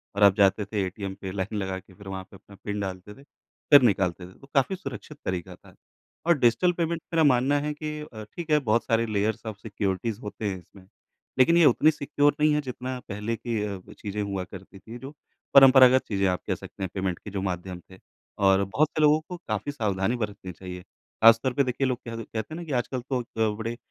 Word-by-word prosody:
और 100 Hz, -, +2 dB
आप 100 Hz, -2 st, +7 dB
जाते 100 Hz, 0 st, +3 dB
थे 105 Hz, -1 st, -2 dB
एटीएम 95 Hz, +1 st, -5 dB
पे 95 Hz, -, -5 dB
लाइन 95 Hz, +2 st, -3 dB
लगा 95 Hz, -1 st, -2 dB
के 95 Hz, +1 st, -20 dB
फिर 100 Hz, +1 st, -14 dB
वहाँ 95 Hz, -1 st, -5 dB
पे -, -, -13 dB
अपना 100 Hz, +1 st, -16 dB
पिन 105 Hz, 0 st, -3 dB
डालते 95 Hz, 0 st, -5 dB
थे, 135 Hz, -, -17 dB
फिर 145 Hz, 0 st, +2 dB
निकालते 95 Hz, -6 st, +1 dB
थे, -, -, -15 dB
तो 135 Hz, -, -16 dB
काफ़ी 140 Hz, +7 st, +2 dB
सुरक्षित 145 Hz, -2 st, -8 dB
तरीका 90 Hz, 0 st, -3 dB
था। -, -, -20 dB, 0.5 s
और 170 Hz, -2 st, +5 dB
डिजिटल 125 Hz, +10 st, +4 dB
पेमेंट 170 Hz, -1 st, -2 dB
मेरा 165 Hz, -1 st, +4 dB
मानना 140 Hz, +1 st, +3 dB
है 150 Hz, +1 st, -2 dB
कि 150 Hz, 0 st, -5 dB
अ, 115 Hz, -8 st, -9 dB
ठीक 160 Hz, +10 st, -8 dB
है, 150 Hz, -, +5 dB
बहुत 115 Hz, -4 st, +1 dB
सारे 115 Hz, 0 st, +2 dB
लेयर्स 110 Hz, 0 st, -1 dB
ऑफ 110 Hz, -3 st, -5 dB
सिक्योरिटीज़ 105 Hz, +1 st, -3 dB
होते 105 Hz, +1 st, -6 dB
हैं 95 Hz, -, -4 dB
इसमें, 95 Hz, +2 st, -18 dB, 0.5 s
लेकिन 165 Hz, +7 st, +6 dB
ये 170 Hz, -, +6 dB
उतनी 150 Hz, +4 st, +5 dB
सिक्योर 145 Hz, -1 st, +1 dB
नहीं 150 Hz, 0 st, +4 dB
है, 150 Hz, -, +1 dB
जितना 130 Hz, -1 st, -5 dB
पहले 105 Hz, +3 st, -3 dB
की 115 Hz, -1 st, -3 dB
अ, 100 Hz, -2 st, -4 dB
चीज़ें 105 Hz, 0 st, -5 dB
हुआ 100 Hz, -2 st, -2 dB
करती 95 Hz, +1 st, -12 dB
थी, 115 Hz, +5 st, -10 dB
जो 135 Hz, +3 st, -9 dB, 0.4 s
परंपरागत 130 Hz, -1 st, +8 dB
चीज़ें 100 Hz, -2 st, +1 dB
आप 90 Hz, -1 st, 0 dB
कह -, -, 0 dB
सकते -, -, -9 dB
हैं, 95 Hz, -, -2 dB
पेमेंट 95 Hz, -2 st, -2 dB
की -, -, -9 dB
जो 100 Hz, -1 st, -3 dB
माध्यम 90 Hz, -1 st, -4 dB
थे। 95 Hz, -, -14 dB, 0.5 s
और 95 Hz, 0 st, +4 dB
बहुत 140 Hz, +11 st, +1 dB
से -, -, +2 dB
लोगों 150 Hz, 0 st, +5 dB
को 180 Hz, -, -5 dB
काफ़ी 110 Hz, +6 st, -2 dB
सावधानी 105 Hz, -4 st, -1 dB
बरतनी 105 Hz, -5 st, -5 dB
चाहिए, 90 Hz, +1 st, -8 dB
ख़ास 115 Hz, +4 st, +3 dB
तौर 130 Hz, -2 st, 0 dB
पे 140 Hz, -, +2 dB
देखिए 130 Hz, +1 st, -1 dB
लोग 125 Hz, -1 st, -1 dB
कह 115 Hz, -, -5 dB
दे 115 Hz, -, -5 dB
कहते 110 Hz, +8 st, -6 dB
हैं -, -, -4 dB
ना -, -, -6 dB
कि 155 Hz, -, -7 dB
आजकल 125 Hz, +1 st, -5 dB
तो 130 Hz, -2 st, 0 dB
अ, 110 Hz, -2 st, -1 dB
बड़े 115 Hz, +1 st, -4 dB
110 Hz, 230 wpm, -26 LUFS, 95-135 Hz, 0.5 s, परंपरागत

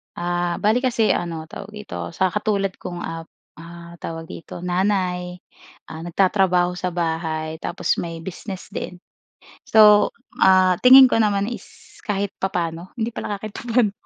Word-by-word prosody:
Ah, 175 Hz, 0 st, -1 dB
bale 220 Hz, +4 st, +3 dB
kasi 235 Hz, -4 st, +2 dB
ano, 165 Hz, -2 st, -2 dB
tawag 200 Hz, +6 st, -10 dB
dito? 210 Hz, 0 st, -6 dB
Sa 185 Hz, -1 st, +1 dB
katulad 200 Hz, -2 st, 0 dB
kong, 175 Hz, -1 st, -6 dB
ah, 165 Hz, 0 st, -6 dB, 0.3 s
ah, 170 Hz, 0 st, -11 dB
tawag 165 Hz, 0 st, -6 dB
dito? 170 Hz, -, -9 dB
Nanay, 180 Hz, -1 st, -1 dB, 0.6 s
ah, 160 Hz, -, -7 dB
nagtatrabaho 180 Hz, -1 st, +2 dB
sa 180 Hz, 0 st, -4 dB
bahay 160 Hz, -2 st, -3 dB
tapos -, -, -1 dB
may 165 Hz, -1 st, -6 dB
business 190 Hz, +2 st, -8 dB
din. 180 Hz, -, -5 dB, 0.7 s
So, 210 Hz, -1 st, +6 dB, 0.3 s
ah, 185 Hz, -1 st, +5 dB
tingin 260 Hz, 0 st, +9 dB
ko -, -, +3 dB
naman 205 Hz, -2 st, +2 dB
is -, -, -8 dB, 0.4 s
kahit 200 Hz, -1 st, -1 dB
papa'no, 175 Hz, -2 st, -3 dB
hindi 230 Hz, -1 st, -2 dB
pala 210 Hz, -2 st, -4 dB
kahit 215 Hz, +1 st, -7 dB
papa'no, 230 Hz, -2 st, 0 dB
185 Hz, 145 wpm, -22 LUFS, 170-210 Hz, 0.7 s, tingin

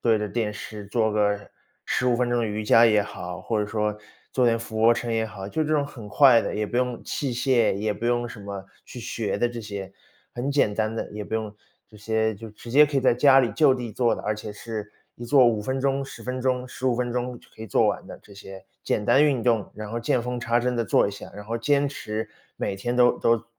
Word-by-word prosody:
对 115 Hz, -2 st, +3 dB
着 105 Hz, 0 st, -2 dB
电 105 Hz, 0 st, -2 dB
视 105 Hz, 0 st, -8 dB
做 110 Hz, +1 st, +1 dB
个 105 Hz, -1 st, +2 dB, 0.5 s
15 125 Hz, -1 st, +1 dB
分 125 Hz, 0 st, 0 dB
钟 120 Hz, -, +1 dB
的 115 Hz, -, 0 dB
瑜 105 Hz, 0 st, -3 dB
伽 115 Hz, +2 st, +6 dB
也 105 Hz, -2 st, +4 dB
好， 90 Hz, -3 st, -7 dB
或 110 Hz, -2 st, -1 dB
者 105 Hz, -, -1 dB
说 105 Hz, 0 st, -1 dB, 0.4 s
做 125 Hz, -2 st, +3 dB
点 115 Hz, -1 st, +3 dB
俯 110 Hz, -1 st, -5 dB
卧 115 Hz, +1 st, +6 dB
撑 120 Hz, -1 st, -3 dB
也 110 Hz, 0 st, 0 dB
好。 95 Hz, -1 st, -8 dB
就 155 Hz, +10 st, -1 dB
这 155 Hz, 0 st, 0 dB
种 145 Hz, -1 st, +1 dB
很 120 Hz, -7 st, -10 dB
快 125 Hz, 0 st, +6 dB
的， -, -, -3 dB
也 105 Hz, -, -1 dB
不 120 Hz, -, -1 dB
用 125 Hz, -1 st, -1 dB
器 135 Hz, -4 st, -2 dB
械， 120 Hz, -4 st, +2 dB
也 105 Hz, +2 st, -1 dB
不 115 Hz, +3 st, -4 dB
用 120 Hz, 0 st, +1 dB
什 110 Hz, -3 st, -9 dB
么 100 Hz, -1 st, -7 dB, 0.2 s
去 -, -, -9 dB
学 110 Hz, -2 st, -3 dB
的 120 Hz, +4 st, +2 dB
这 120 Hz, 0 st, -5 dB
些， 100 Hz, -3 st, -7 dB, 0.4 s
很 125 Hz, +4 st, -3 dB
简 140 Hz, -7 st, +2 dB
单 110 Hz, +1 st, -1 dB
的， -, -, -4 dB
也 105 Hz, 0 st, -6 dB
不 110 Hz, -, -5 dB
用 110 Hz, -2 st, -3 dB, 0.3 s
这 110 Hz, -, -24 dB
些 110 Hz, +1 st, 0 dB
就 110 Hz, +3 st, -9 dB
直 115 Hz, +2 st, -12 dB
接 150 Hz, +4 st, +7 dB
可 145 Hz, -1 st, -3 dB
以 -, -, +3 dB
在 130 Hz, -, +4 dB
家 135 Hz, +1 st, +6 dB
里 120 Hz, -4 st, +1 dB
就 135 Hz, +2 st, +4 dB
地 120 Hz, -3 st, -5 dB
做 120 Hz, +2 st, +2 dB
的， -, -, -8 dB
而 105 Hz, -, -1 dB
且 105 Hz, 0 st, -7 dB
是 105 Hz, 0 st, -6 dB, 0.3 s
一 120 Hz, -, -8 dB
做 130 Hz, 0 st, +6 dB
5 110 Hz, -3 st, +2 dB
分 130 Hz, +5 st, -2 dB
钟、 135 Hz, 0 st, +1 dB
10 135 Hz, -, -9 dB
分 125 Hz, 0 st, -4 dB
钟、 125 Hz, -1 st, 0 dB
15 130 Hz, -1 st, -1 dB
分 120 Hz, -1 st, -1 dB
钟 125 Hz, 0 st, -3 dB
就 -, -, -22 dB
可 -, -, -16 dB
以 110 Hz, -, -6 dB
做 -, -, +3 dB
完 -, -, -1 dB
的， -, -, -10 dB
这 100 Hz, -, -17 dB
些 95 Hz, -1 st, -11 dB, 0.2 s
简 105 Hz, -, -1 dB
单 135 Hz, -, +5 dB
运 140 Hz, -5 st, +2 dB
动， 115 Hz, -4 st, +1 dB
然 105 Hz, -1 st, -7 dB
后 115 Hz, -, -2 dB
见 120 Hz, +1 st, +1 dB
缝 125 Hz, +1 st, -3 dB
插 120 Hz, -1 st, +1 dB
针 125 Hz, +1 st, 0 dB
地 115 Hz, -, 0 dB
做 -, -, +3 dB
一 -, -, -2 dB
下， 100 Hz, -, -10 dB
然 105 Hz, 0 st, -9 dB
后 115 Hz, +2 st, -3 dB
坚 145 Hz, +3 st, +2 dB
持 110 Hz, -5 st, -4 dB, 0.3 s
每 95 Hz, -, -2 dB
天 120 Hz, +5 st, -3 dB
都 125 Hz, 0 st, +4 dB
都 115 Hz, -1 st, +2 dB
115 Hz, 270 characters per minute, -25 LUFS, 105-125 Hz, 0.5 s, 接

